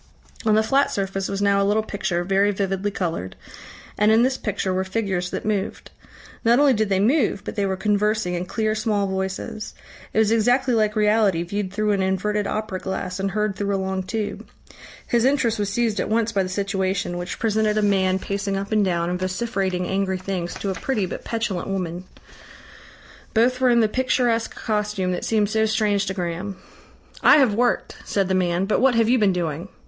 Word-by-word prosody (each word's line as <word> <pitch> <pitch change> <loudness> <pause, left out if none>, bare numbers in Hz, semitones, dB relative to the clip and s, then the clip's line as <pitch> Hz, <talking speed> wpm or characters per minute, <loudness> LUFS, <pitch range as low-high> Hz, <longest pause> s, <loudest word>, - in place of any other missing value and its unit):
On 215 - +5
the 220 - +4
flat 275 +5 +2
surface 195 -1 -2
was 200 0 -2
now 200 0 +3
a - - +3
little 210 +2 +2
picture, 190 -4 -2
very 195 +2 +2
vividly 195 0 -1
coloured, 165 - -3 0.6
and 210 +1 +5
in 225 +2 +5
this 260 +1 +2
picture 200 -5 -2
were 185 +1 0
figures 190 -3 -2
that - - -5
moved. 205 -2 -2 0.5
Not 235 +1 +4
only 285 -1 +5
did 215 -2 0
they 190 -1 +2
move, 225 -1 +2
but - - -6
they 200 -1 0
were 190 - -1
conversing 210 -1 +1
in 175 +1 -3
clear 215 +1 0
small 215 -2 0
voices. 190 +2 -4 0.4
It - - -5
was 220 -1 +4
exactly 245 +3 +3
like 215 -1 +2
reality 210 -5 +3
viewed 195 +2 -3
through 210 +1 0
an 200 -1 +1
inverted 200 +2 0
opera 215 -3 -3
glass 190 -1 -4
and 195 0 0
heard 210 0 -1
through 200 0 -1
a - - +1
long 190 0 -2
tube. 210 +3 -4 0.6
His 235 -1 +1
interest 255 -5 +2
was 205 -1 0
seized 225 -1 0
at - - -1
once 225 +1 +1
by 200 - +1
the 185 - -2
situation, 190 -2 -1
which 175 +1 -5
presented 215 -1 +1
a 215 - +2
man 190 -2 +2
pacing 200 0 -3
up 200 +2 -5
and 215 -1 +3
down 170 -3 0
and 180 +1 -2
vociferating 185 -1 -1
angry 190 -1 0
things 185 -2 -4
to 200 - -3
a - - -1
pretty 215 0 -1
but - - -6
petulant 225 -6 -2
woman. 180 -2 -3 1.3
Both 250 +3 +3
were 255 - +4
in 235 -1 +4
the 220 - +4
picturesque 245 -1 0
costume 210 -4 -1
that 180 - -3
seemed 210 -2 +1
so 220 0 +2
strange 210 -2 +1
to 190 - -2
Graham. 180 +2 -4 0.6
"I - - +7
have 260 -7 +4
worked," 240 +3 0
said 195 -2 -1
the - - +1
man, 180 0 +1
"but 210 - +1
what 260 -2 +4
have 230 -1 +3
you 250 +2 +3
been 205 -3 +4
doing?" 170 -1 -3
200 Hz, 205 wpm, -23 LUFS, 190-220 Hz, 1.3 s, I